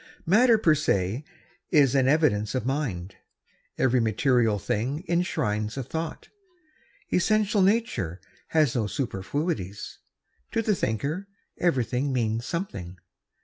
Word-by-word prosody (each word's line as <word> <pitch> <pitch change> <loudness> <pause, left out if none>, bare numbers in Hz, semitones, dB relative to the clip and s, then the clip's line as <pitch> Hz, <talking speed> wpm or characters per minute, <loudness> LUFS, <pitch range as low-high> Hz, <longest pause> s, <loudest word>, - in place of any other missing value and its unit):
Matter 230 +6 +5
per 170 -7 +4
se 110 -4 0 0.5
is 140 -4 +4
an 135 -2 +3
evidence 135 -8 +2
of 125 - -1
mind. 120 -10 -3 0.6
Every 130 -1 +3
material 115 0 +2
thing 130 - -2
enshrines 110 - -1
a 135 - -2
thought. 160 +6 -5 0.8
Essential 210 +2 +2
nature 195 - +1 0.3
has 155 -6 +2
no 110 -4 0
superfluities. 105 - -3 0.5
To 225 - +1
the 215 - +2
thinker 150 - -2 0.3
everything 135 -4 +1
means 115 -1 -1
something. 95 - -5
135 Hz, 110 wpm, -26 LUFS, 110-165 Hz, 0.8 s, Matter